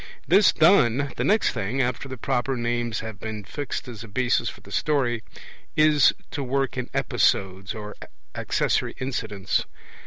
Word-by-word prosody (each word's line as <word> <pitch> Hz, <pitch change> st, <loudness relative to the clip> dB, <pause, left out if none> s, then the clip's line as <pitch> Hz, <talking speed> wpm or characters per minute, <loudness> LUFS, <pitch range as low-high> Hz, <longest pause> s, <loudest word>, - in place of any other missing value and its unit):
This 200 Hz, -1 st, +6 dB
done, 145 Hz, -, +4 dB
the -, -, -1 dB
next 215 Hz, +1 st, +3 dB
thing, 110 Hz, +8 st, -3 dB
after 125 Hz, +1 st, -1 dB
the 130 Hz, -, -6 dB
proper 130 Hz, +2 st, -1 dB
names 120 Hz, -1 st, -1 dB
have 110 Hz, -1 st, -7 dB
been 110 Hz, -2 st, -5 dB
fixed 140 Hz, +7 st, -5 dB
as 115 Hz, -3 st, -8 dB
a -, -, -10 dB
basis 125 Hz, +4 st, +1 dB
for -, -, -11 dB
the -, -, -15 dB
story, 125 Hz, -6 st, +1 dB, 0.5 s
is 155 Hz, -2 st, +5 dB, 0.2 s
to 145 Hz, -, -3 dB
work 135 Hz, +1 st, -1 dB
in 125 Hz, -1 st, -4 dB
episodes 95 Hz, +1 st, 0 dB
or 105 Hz, -1 st, -7 dB, 0.4 s
accessory -, -, 0 dB
incidents. 110 Hz, -7 st, -2 dB
125 Hz, 155 wpm, -25 LUFS, 110-135 Hz, 0.5 s, This